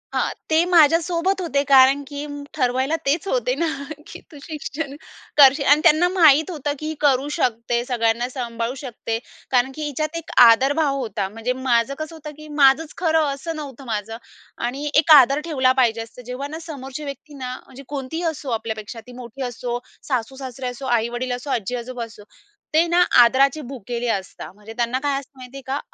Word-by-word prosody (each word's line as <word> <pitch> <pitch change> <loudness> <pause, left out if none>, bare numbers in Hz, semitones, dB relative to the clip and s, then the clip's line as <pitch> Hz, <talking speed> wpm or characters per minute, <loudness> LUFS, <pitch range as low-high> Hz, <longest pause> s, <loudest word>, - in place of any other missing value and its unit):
हां, - - +1 0.2
ते 315 - +4
माझ्यासोबत 340 +3 +3
होते 285 -5 0
कारण 270 +1 +6
की 285 0 -6 0.3
ठरवायला 260 +1 0
तेच 305 +7 0
होते - - 0
ना, 335 - 0 0.4
की - - -10
तू 295 - -12
शिक्षण 300 -2 -5 0.4
करशील 275 0 +7
अन् 300 - +1
त्यांना 340 +1 +5
माहीत 320 -4 +5
होतं, 295 -3 -3
की 310 - -6
ही 315 - -3
करू 280 -2 +3
शकते 235 0 0
सगळ्यांना 240 -1 0
सांभाळू 235 -1 -4
शकते. 230 -3 -4 0.3
कारण 255 0 +2
की 310 - -5
हिच्यात 305 +3 -3
एक 330 - -8
आदरभाव 275 +5 +4
होता. 215 -5 -3
म्हणजे 225 +4 -3
माझं 235 +2 +2
कसं 310 +1 -6
होतं, 305 -1 -9
की 305 - -11
माझंच 275 +4 +4
खरं 320 -3 +2
असं 320 +4 -6
नव्हतं 275 -3 -8
माझं 215 +2 -4 0.5
आणि 280 +4 -4
एक 300 +2 +4
आदर 275 +3 +3
ठेवला 260 -4 +3
पाहिजे 230 -2 +1
असं 225 +2 -10
जेव्हा 275 +3 -4
ना, 315 +2 -7
समोरची 270 0 -7
व्यक्ती 285 +1 -8
ना 250 0 -4
म्हणजे 270 +1 -13
कोणतीही 285 +4 -5
असो 275 -2 -8
आपल्यापेक्षा 220 0 -6
ती 250 - -11
मोठी 240 +3 -10
असो 240 0 -4 0.3
सासू-सासरे 260 0 -4
असो, 250 +2 -6
आई-वडील 240 +1 -1
असो, 250 +3 -8
आजी-आजोबा 245 +2 -3
असो, 220 -2 -14 0.5
ते 320 +2 +5
ना 345 +1 +2 0.2
आदराची 270 +5 +5
भुकेली 245 -1 -5
असतात 190 -1 -8
म्हणजे 210 +2 -11
त्यांना 240 +2 0
काय 285 -1 +1
असतं 275 0 -16
माहिती 255 +1 -10
आहे 275 - -8
का? 270 +2 -1
270 Hz, 180 wpm, -22 LUFS, 245-300 Hz, 0.5 s, करशील